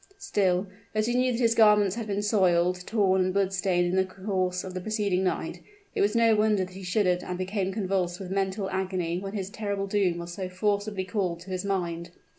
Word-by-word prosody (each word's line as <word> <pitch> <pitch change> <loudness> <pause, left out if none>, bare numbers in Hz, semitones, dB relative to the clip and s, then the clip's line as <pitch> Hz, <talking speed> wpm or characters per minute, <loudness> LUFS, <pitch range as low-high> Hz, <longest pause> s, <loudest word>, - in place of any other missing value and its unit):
Still, 190 - +1 0.3
as 215 0 +2
he 240 - 0
knew 255 +1 +2
that 235 - -2
his 230 -1 +4
garments 210 -4 +5
had 230 -2 -4
been 205 0 -1
soiled, 180 -3 +2
torn 195 -4 +2
and 185 - 0
blood 195 -1 +1
stained 180 -2 +1
in 175 +1 0
the 190 - +4
course 185 -1 -2
of 185 - -7
the 185 - -4
preceding 205 -2 0
night, 185 - -2 0.3
it - - 0
was 205 +3 +2
no 230 -1 +5
wonder 210 -3 +2
that 185 - -14
he 190 - -9
shuddered 180 -1 +1
and 180 - -4
became 190 +1 -2
convulsed 185 -3 -1
with 190 -2 -7
mental 195 0 -1
agony 185 -2 -1
when 195 +1 -6
his 195 -2 -4
terrible 200 -3 -2
doom 195 -3 +1
was 170 0 -6
so 185 0 -4
forcibly 205 +1 -1
called 185 -3 -2
to 190 +2 -10
his 185 -1 -2
mind. 175 -3 -2
190 Hz, 220 wpm, -27 LUFS, 180-205 Hz, 0.3 s, garments